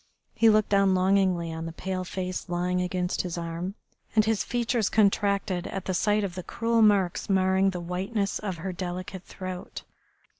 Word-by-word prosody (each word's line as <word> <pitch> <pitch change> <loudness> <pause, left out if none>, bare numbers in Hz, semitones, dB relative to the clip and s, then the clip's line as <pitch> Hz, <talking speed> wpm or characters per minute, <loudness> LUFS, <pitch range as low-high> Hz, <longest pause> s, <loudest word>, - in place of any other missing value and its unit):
He 225 - +5
looked 215 -1 +3
down 195 -2 +4
longingly 185 -3 +2
on 165 0 -5
the - - -5
pale 185 +2 -3
face 185 0 -4
lying 180 +1 0
against 180 0 -1
his 180 -2 -4
arm, 170 +3 -4 0.4
and 215 -1 +5
his 220 -2 +1
features 235 -2 0
contracted 200 -3 +2
at 195 - -5
the 185 - -1
sight 210 +3 +2
of 190 -3 -3
the 185 - -5
cruel 230 +5 0
marks 200 -5 +3
marring 190 0 +3
the 180 -2 -4
whiteness 195 +4 -2
of 195 -4 -4
her 185 +3 -4
delicate 185 +1 -5
throat. 185 -1 -7
190 Hz, 175 wpm, -27 LUFS, 180-200 Hz, 0.4 s, He